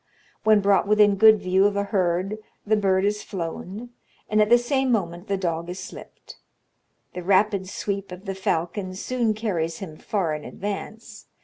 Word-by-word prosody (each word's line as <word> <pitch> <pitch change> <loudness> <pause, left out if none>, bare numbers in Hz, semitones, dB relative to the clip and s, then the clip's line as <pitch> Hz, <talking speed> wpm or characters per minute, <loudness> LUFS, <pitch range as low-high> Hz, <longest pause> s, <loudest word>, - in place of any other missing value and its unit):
When 215 -1 +5
brought 200 0 +3
within 210 -1 +5
good 215 +2 +7
view 190 +1 +2
of 205 - -2
a 200 - +1
herd 195 +1 -1 0.3
the 215 +1 +3
bird 195 -2 +2
is 210 +1 0
flown, 190 +5 -6 0.4
and 215 0 +2
at 210 - +3
the 240 - +7
same 265 +2 0
moment 175 -4 -2
the 200 - 0
dog 170 -2 -2
is 180 - -5
slipped. 185 - -11 0.8
The 180 - -5
rapid 195 +1 +2
sweep 200 -1 -4
of 180 +3 -9
the 195 - -3
falcon 185 +1 -2
soon 230 +1 -1
carries 170 -7 -2
him 160 -6 -8
far 190 -7 -1
in 150 -1 -5
advance. 210 +2 -7
200 Hz, 175 wpm, -24 LUFS, 185-215 Hz, 0.8 s, good